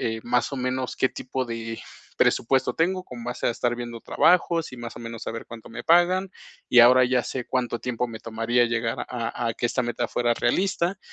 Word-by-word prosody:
eh, 110 - -6
más 125 +3 0
o - - -2
menos, 130 0 -2
qué 130 - +2
tipo 130 +1 -4
de 115 -1 -5 0.4
presupuesto 130 +3 +2
tengo 185 +3 +1
con 120 -2 -9
base 120 +1 -2
a - - +3
estar 120 +1 -1
viendo 120 -1 -6
trabajos 165 -1 +2
y - - -9
más 120 0 -7
o - - -10
menos 115 -1 -7
a - - -1
ver 115 - -7
cuánto 115 -1 -11
me 115 - -7
pagan, 180 +3 +4 0.4
y 120 - +6
ahora 125 +2 +8
ya 125 -1 +1
sé 125 0 -4
cuánto 125 -2 -1
tiempo 125 0 -2
me 115 -1 -8
tomaría 115 +2 +1
llegar 115 -1 -1
a 120 -1 -3
a 115 - -1
que 120 - -2
esta 125 +2 0
meta 120 0 -1
fuera 120 -1 +1
realista. 180 - 0
120 Hz, 215 wpm, -25 LUFS, 115-130 Hz, 0.4 s, ahora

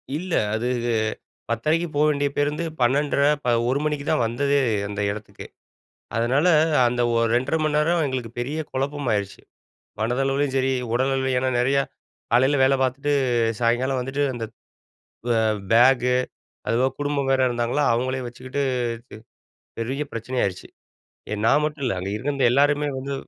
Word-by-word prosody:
இல்ல, 175 +3 -4 0.2
அது 115 +2 -2 0.8
10:30க்கு 155 +9 0
போ 145 - +2
வேண்டிய 145 -1 0
பேருந்து 150 +3 0 0.2
12.30 140 +3 +2 0.2
ப - - -2 0.2
1 135 +2 +1
மணிக்கு 150 -2 -2
தான் 155 - +2
வந்ததே 140 +5 +1 0.3
அந்த 105 0 -4
இடத்துக்கே. 105 +1 -9 0.7
அதனால, 125 +8 +2 0.4
அந்த 120 0 -1
ஒரு 115 0 +2
2.30 130 +6 +1
மணி 155 -1 0
நேரம் 165 +3 +2
எங்களுக்கு 130 -4 -4
பெரிய 140 +6 -3
குழப்பம் 140 +1 -2
ஆயிருச்சு 100 -2 -3 0.6
மனதளவிலும் 135 +4 0
சரி 135 0 +1 0.2
உடல் 130 +3 +1
அளவிலும். 130 -1 0
ஏன்னா, 130 +1 0
நெறையா 135 +3 +2 0.5
காலையில 130 +4 +4
வேல 135 +1 +4
பார்த்துட்டு 135 +3 0 0.5
சாயங்காலம் 125 +3 +1
வந்துட்டு 135 +3 -1
அந்த 115 -2 -4 0.9
வ 120 - +3 0.4
பேக்கு 125 +1 +5 0.5
அதுவும் 130 +3 +1
குடும்பம் 145 -1 -1
வேற 135 0 +3
இருந்தாங்களா, 120 +4 0
அவங்களே 130 +2 -1
வச்சுக்கிட்டு 130 +3 -5 1.2
பெரிய 130 +5 -3
பிரச்சனை 115 +3 -5
ஆயிருச்சு. 95 -2 -3 0.6
எ - - -1
நான் 145 +6 +4
மட்டும் 150 -2 -4
இல்ல 115 -7 -1
அங்கே 95 +2 -4
இருந்த 140 +4 -3
எல்லாருமே 145 +2 +3
வந்து 135 +1 -4
130 Hz, 140 wpm, -23 LUFS, 120-145 Hz, 1.2 s, பேக்கு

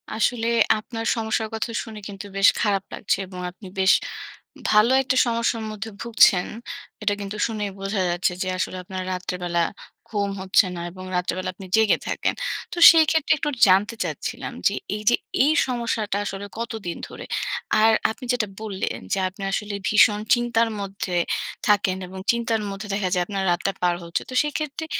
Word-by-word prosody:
আসলে 230 +1 +1 0.3
আপনার 225 +1 -6
সমস্যার 220 -1 -1
কথা 220 +1 -2
শুনে 220 -1 -9
কিন্তু 200 0 -8
বেশ 195 - +6
খারাপ 200 -3 +1
লাগছে - - 0
এবং 180 -1 -9
আপনি 190 +2 -13
বেশ 190 0 +5 0.8
ভালো 215 +3 +5
একটা 260 -1 0
সমস্যার 230 -1 0
মধ্যে 215 +1 -6
ভুগছেন। 220 -5 +4 0.6
এটা 205 - +2
কিন্তু 200 +1 -5
শুনেই 210 -3 -3
বোঝা 195 0 -1
যাচ্ছে 175 +1 +1
যে 185 - -1
আসলে 185 - -2
আপনার 185 +1 -5
রাত্রেবেলা 180 -1 -2 0.5
ঘুম 205 -2 -1
হচ্ছে 190 +2 +4
না - - -5
এবং 185 +1 -10
রাত্রেবেলা 185 +1 -1
আপনি 190 +1 -10
জেগে 220 -2 +4
থাকেন। - - 0 0.4
তো - - -7
সেই 325 -2 +5
ক্ষেত্রে 320 0 +3
একটু 295 - -1 0.2
জানতে 195 +5 +4
চাচ্ছিলাম - - -5
যে - - +1 0.2
এইযে 215 +3 +3 0.3
এই 290 - +4 0.2
সমস্যাটা 230 -4 -1
আসলে 195 0 -5
কতদিন 220 -7 -4
ধরে? - - -9 0.6
আর 225 - +6 0.2
আপনি 250 +3 -9
যেটা 235 -4 0
বললেন 205 -3 -3
যে - - +1
আপনি 195 +2 -14
আসলে 205 +1 -2
ভীষণ 210 0 +5
চিন্তার 235 -1 +2
মধ্যে 195 -2 -4 0.5
থাকেন 200 -3 +3
এবং 190 +1 -9
চিন্তার 235 -2 -1
মধ্যে 200 +1 -6
দেখা 200 -2 0
যায় 180 -2 +2
আপনার 195 0 -3
রাতটা 175 +3 0
পার 175 -1 +2
হচ্ছে। 170 0 -2
তো - - -7
সেক্ষেত্রে 300 +1 -3
210 Hz, 165 wpm, -23 LUFS, 190-230 Hz, 0.8 s, বেশ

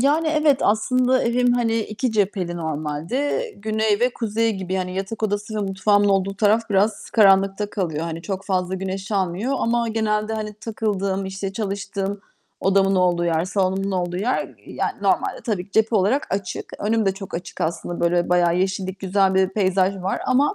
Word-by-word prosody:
Yani, 305 +5 +3
evet, 305 -3 +3
aslında 255 +4 +2
evim, 245 +1 +2
hani, 230 -2 +1
2 220 +3 -2
cepheli 190 -4 0
normalde. 160 - -2
Güney 215 0 0
ve 250 +1 +3
kuzey 225 0 0
gibi. 190 -2 -5
Yani 185 -1 -2
yatak 195 +4 -4
odası 210 +1 -2
ve - - -1
mutfağımın 205 +1 +2
olduğu 195 0 +1
taraf 215 +3 +3
biraz 205 +2 +1
karanlıkta 195 -1 +4
kalıyor. 165 -6 -2
Hani, 165 0 -4
çok 195 0 -4
fazla 185 -1 -1
güneş 190 +2 -4
almıyor 195 +6 0
ama 235 0 +1
genelde 220 0 0
hani 210 -1 -4
takıldığım, 200 -3 -2
işte 195 0 -4
çalıştığım, 200 -1 -3 0.4
odamın 195 0 +3
olduğu 175 -1 +2
yer, 165 0 +1
salonumun 195 0 0
olduğu 180 -1 -1
yer, 230 +7 -1
yani, - - -2
normalde - - +1
tabii 205 -7 -1
ki 200 - -27
cephe 220 +1 +3
olarak 210 +9 +2
açık. 195 -2 -5
Önüm 220 0 +1
de 190 - +3
çok 195 -1 -8
açık 175 +1 -6
aslında 170 +1 -2
böyle, 175 0 +2
bayağı 175 0 +3
yeşillik, 190 0 -1
güzel 190 0 +2
bir 190 0 +3
peyzaj 190 -1 +1
var 190 +1 -2
ama, 280 +9 +3
195 Hz, 170 wpm, -22 LUFS, 185-220 Hz, 0.4 s, karanlıkta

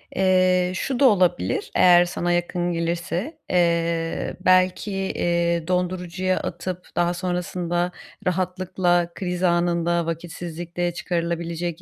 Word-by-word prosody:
Eee, 185 -1 +3
şu 250 +6 -2
da 280 - +5
olabilir 180 - +2
eğer 175 -1 +6
sana 175 0 -2
yakın 175 0 0
gelirse, 170 - -2
eee, 170 -2 0
belki, 185 +2 +3
eee, 170 -3 0
dondurucuya 180 0 -1
atıp 180 +1 -5
daha 175 0 +2
sonrasında 175 -1 -2 0.4
rahatlıkla 180 -1 0
kriz 180 -1 -3
anında 170 -1 +2
vakitsizlikte 170 +1 -4
çıkarılabilecek 170 -1 -3
175 Hz, 100 wpm, -23 LUFS, 170-185 Hz, 0.4 s, eğer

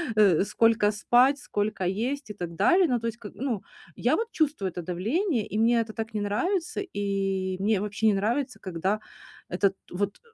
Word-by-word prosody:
э, 195 -6 +5
сколько 225 0 +3
спать, 250 +6 +3
сколько 205 -6 -2
есть 235 +8 -2
и - - -5
так 175 -3 -5
далее. 360 - +4
Ну, 245 -3 +1
то 230 - -3
есть, 230 +1 -4
как 210 -3 -9
ну 245 -6 -2 0.3
Я - - +2
вот 455 - -1
чувствую 290 - 0
это 175 - -6
давление, 225 - -1
и 210 - -4
мне 230 +1 +4
это 220 -1 -6
так 225 0 -5
не 210 - -1
нравится, 340 - -1
и 195 - -2
мне 205 0 +1
вообще 210 +1 -2
не 210 - +5
нравится, 240 +7 -1
когда 190 +3 -1 0.5
этот, 190 +2 +1 0.2
вот 200 +2 -2
215 Hz, 185 wpm, -27 LUFS, 195-245 Hz, 0.5 s, э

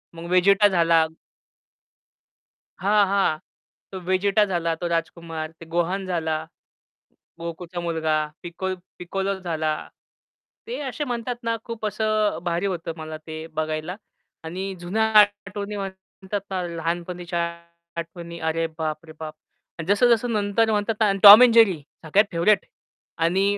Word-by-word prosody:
मग 165 - -8
वेजेटा 195 +3 +5
झाला. 170 -3 +3 1.7
हां, 205 +2 +4
हां, 195 -5 +2 0.5
तो 190 - -5
वेजेटा 195 +2 +3
झाला, 170 -2 0
तो 175 - -2
राजकुमार, 165 -1 -3
ते 165 0 -14
गोहान 180 +3 0
झाला, 160 -3 -1 1.1
गोकूचा 170 +1 -6
मुलगा 160 -2 0 0.3
पिक 175 +2 -9 0.4
पिकोलो 195 +2 -2
झाला. 160 -4 -1 0.9
ते 475 - -4
असे 280 +2 -3
म्हणतात 245 -1 -3
ना 230 0 0
खूप 230 -2 -5
असं 215 0 0
भारी 175 +2 -1
होतं 170 -3 -3
मला 155 0 -6
ते 155 0 -9 0.2
बघायला. 155 +3 -3 0.5
आणि 175 +4 -5 0.2
जुन्या 185 +6 0 0.2
आठवणी 205 0 0
म्हणतात 190 +1 -6
ना 190 -1 -2
लहानपणीच्या 175 +1 -3 0.6
आठवणी 170 0 -7
अरे, 160 +1 0
बाप 155 0 -3
रे 160 - -12
बाप! 155 -1 -6 0.5
जसं 225 +5 +4
जसं 235 +1 +2
नंतर 215 +2 +1
म्हणतात 210 +1 0
ना 220 - +4
आणि 195 - 0
Tom 210 +5 +13
and 235 - +3
Jerry 200 -7 +6 0.3
सगळ्यात 195 +7 +4
फेवरीट 175 +5 +3 0.6
आणि 185 +4 +2
180 Hz, 130 wpm, -24 LUFS, 165-205 Hz, 1.7 s, Tom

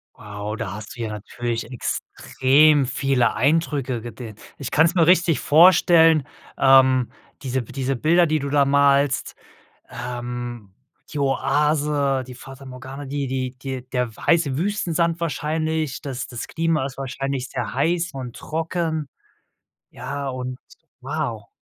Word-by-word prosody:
Wow, 105 +1 -6
da 110 -4 -5
hast 105 0 -9
du 120 - -7
ja 110 - -2
natürlich 115 +3 -4
extrem 140 +4 +2
viele 135 -1 +1
Eindrücke 140 -3 0
gesehen. 115 -2 -8 0.2
Ich 140 - -4
kann's 165 +3 +3
mir 170 -3 +3
richtig 175 -3 +4
vorstellen, 165 -1 +6 0.3
ähm, 130 -2 +5 0.3
diese 130 -2 -2
diese 135 +2 -3
Bilder, 170 +6 +3
die 155 0 +1
du 140 0 -4
da 145 0 +4
malst, 140 0 +2 0.5
ähm, 120 -4 -6 0.4
die 145 - -3
Oase, 140 0 +1
die 125 - -9
Fata 135 +2 -12
Morgana, 130 +2 -8
die 140 0 -3
die 130 -1 -3
die 130 -2 -5
der 125 -3 -2
weiße 155 -6 +2
Wüstensand 170 -3 0
wahrscheinlich. 155 -2 -2
Das 130 -3 -5
das 120 -3 -7
Klima 165 -4 0
ist 135 - -11
wahrscheinlich 135 -1 -4
sehr 120 0 -4
heiß 170 +4 +1
und 125 -3 -7
trocken. 160 -1 -3 0.8
Ja, 140 +3 -5
und 130 0 -5 0.4
wow. 125 -7 -4
135 Hz, 135 wpm, -22 LUFS, 125-155 Hz, 0.8 s, vorstellen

